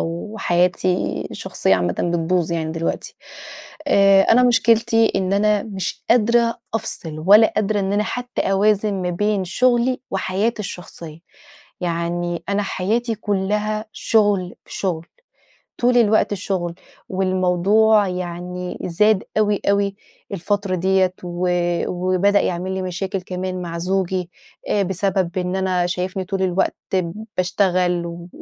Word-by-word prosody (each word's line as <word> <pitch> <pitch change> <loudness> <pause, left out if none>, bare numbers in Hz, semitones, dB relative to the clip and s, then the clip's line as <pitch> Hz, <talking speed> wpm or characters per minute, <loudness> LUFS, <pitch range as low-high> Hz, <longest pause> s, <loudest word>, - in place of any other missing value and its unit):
وحياتي 180 0 0 0.3
الشخصية - - 0
عامةً 90 -1 0
بتبوظ 170 0 0
يعني 160 -1 -2
دلوقتي. 165 0 -3 0.7
آآ 195 -4 +6
أنا 245 +5 +4
مشكلتي 225 -2 +3
إن 190 0 0
أنا 210 0 +2
مش 195 -4 -5
قادرة 235 0 +3
أفصل، 160 -7 -4
ولا 215 +3 +7
قادرة 210 -1 +1
إن 195 +1 -1
أنا 210 +1 +1
حتى 245 +2 -4
أوازن، 205 +1 +2
ما 180 - -1
بين 205 +1 0
شغلي 250 +5 +1
وحياتي 200 +4 -1
الشخصية، 170 -4 -8 0.6
يعني 175 0 -2
أنا 200 +1 +1
حياتي 225 +5 -1
كلها 210 +1 -1
شغل 205 -5 +1
في - - -10
شغل، 170 -4 -2 0.8
طول 245 0 +4
الوقت 215 -2 +3
شغل، 180 -3 -3 0.3
والموضوع 190 +3 +3
يعني 180 0 -5
زاد 210 +3 +2
أوي، 210 -1 +2
أوي 200 0 +1 0.4
الفترة 200 +1 -1
دِيَّة، 185 +1 +2
و 175 +1 -2 0.7
وبدأ 200 +2 +3
يعمل 180 +1 -2
لي 190 0 -2
مشاكل 185 +1 -3
كمان 185 0 -4
مع 170 -1 -5
زوجي، 185 0 -1 0.4
آآ 205 - +2
بسبب 190 -1 -1
إن 180 0 -1
أنا 185 -2 +1
شايفني 185 +1 -3
طول 195 0 -3
الوقت 185 +1 +1 0.6
باشتغل 180 -2 +1
و 170 0 -8
190 Hz, 125 wpm, -21 LUFS, 180-210 Hz, 0.8 s, ولا